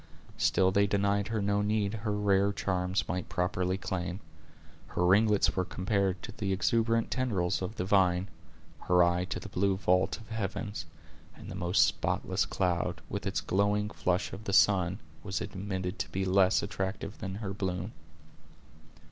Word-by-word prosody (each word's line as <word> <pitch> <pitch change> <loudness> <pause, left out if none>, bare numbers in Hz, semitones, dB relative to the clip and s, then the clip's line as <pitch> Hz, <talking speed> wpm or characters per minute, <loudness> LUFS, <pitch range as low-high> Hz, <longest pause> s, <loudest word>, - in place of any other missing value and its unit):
Still 95 0 +3
they 100 +1 +3
denied 100 0 +1
her 110 -3 -1
no 100 0 +1
need 105 0 0
her 105 -1 -1
rare 100 -1 +3
charms 95 -1 -1
might 90 0 -3
properly 90 +1 0
claim. 90 -1 -3 0.7
Her 90 - -1
ringlets 105 +3 +4
were 95 - +1
compared 95 0 -1
to - - -6
the 100 -2 -3
exuberant 115 +4 +1
tendrils 100 -10 0
of 95 +4 -4
the 90 - -2
vine, 95 -1 +3 0.6
her 90 0 +5
eye 85 +1 +2
to - - -4
the - - -8
blue 100 0 +1
vault 90 -1 +2
of 110 - -15
heavens, 105 -3 -4 0.5
and - - -10
the - - -6
most 90 +3 +3
spotless - - -1
cloud, 90 -2 -1
with - - -3
its - - -1
glowing 105 +2 +1
flush 90 +1 -1
of 100 +3 -8
the 100 - -2
sun, 95 -2 +4 0.2
was 95 -1 -3
admitted 95 -1 -4
to - - -2
be 95 0 -2
less 95 0 +3
attractive 100 0 -4
than 95 -2 -5
her 100 -2 -4
bloom. 95 0 -3
95 Hz, 165 wpm, -30 LUFS, 90-105 Hz, 0.7 s, her